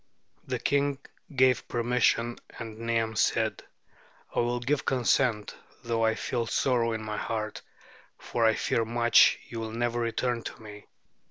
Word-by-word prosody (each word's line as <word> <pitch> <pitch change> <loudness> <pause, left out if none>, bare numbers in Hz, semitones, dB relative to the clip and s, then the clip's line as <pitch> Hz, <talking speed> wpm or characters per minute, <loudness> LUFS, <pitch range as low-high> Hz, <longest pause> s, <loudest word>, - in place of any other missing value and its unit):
The - - -1
king 140 0 +1 0.4
gave 130 -1 +3
permission, 120 0 +1 0.2
and 110 -1 -8
Niam 115 -1 -1
said: - - +1 0.7
"I - - +2
will 120 +1 0
give 135 +4 0
consent, 125 -4 +1 0.3
though 115 -1 0
I 110 0 +3
feel 120 -2 -2
sorrow 120 -1 +1
in 110 -1 -4
my 105 -1 -4
heart, 110 -1 -3 0.6
for 120 - -2
I 110 -1 +4
fear 115 - 0
much 120 +1 +5
you 115 - -6
will 110 -1 -5
never 120 +1 -1
return 120 +1 -1
to - - -8
me." 105 -2 -12
115 Hz, 150 wpm, -28 LUFS, 110-120 Hz, 0.7 s, much